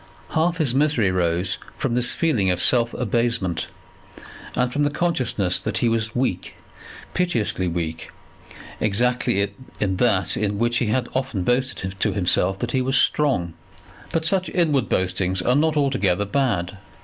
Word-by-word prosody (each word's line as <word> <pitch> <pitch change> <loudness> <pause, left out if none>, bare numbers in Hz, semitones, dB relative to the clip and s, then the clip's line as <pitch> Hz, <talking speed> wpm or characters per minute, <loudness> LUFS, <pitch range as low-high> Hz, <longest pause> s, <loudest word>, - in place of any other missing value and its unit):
Half 165 +2 +1
his 150 -7 +1
misery 135 -8 +2
rose 90 +1 0 0.2
from 135 -4 -1
this 125 0 +4
feeling 125 - +1
of 90 -1 0
self 115 +5 +2
abasement, 115 -7 -1 0.9
and 125 0 0
from 145 - 0
the 145 - +3
consciousness 130 - 0
that 105 -3 -3
he 120 - +2
was 110 -1 -1
weak, 120 -8 -2 0.6
piteously 115 - 0
weak, 85 -1 -4 0.7
exactly 110 -2 +1 0.3
in 95 -2 0
that 100 -4 +2
in 105 -1 -1
which 120 +2 +1
he 120 - 0
had 120 +3 0
often 130 -8 -2
boasted 120 -5 -1
to - - +1
himself 95 -1 +1
that 120 +4 -3
he 130 - +1
was 135 +1 +1
strong. 125 - +2 0.6
But 160 -1 -1
such 185 +2 +1
inward 150 -8 +1
boastings 95 0 0
are 125 - +2
not 155 +1 +2
altogether 105 -9 +1
bad. 100 -6 -1
115 Hz, 150 wpm, -22 LUFS, 95-135 Hz, 0.9 s, this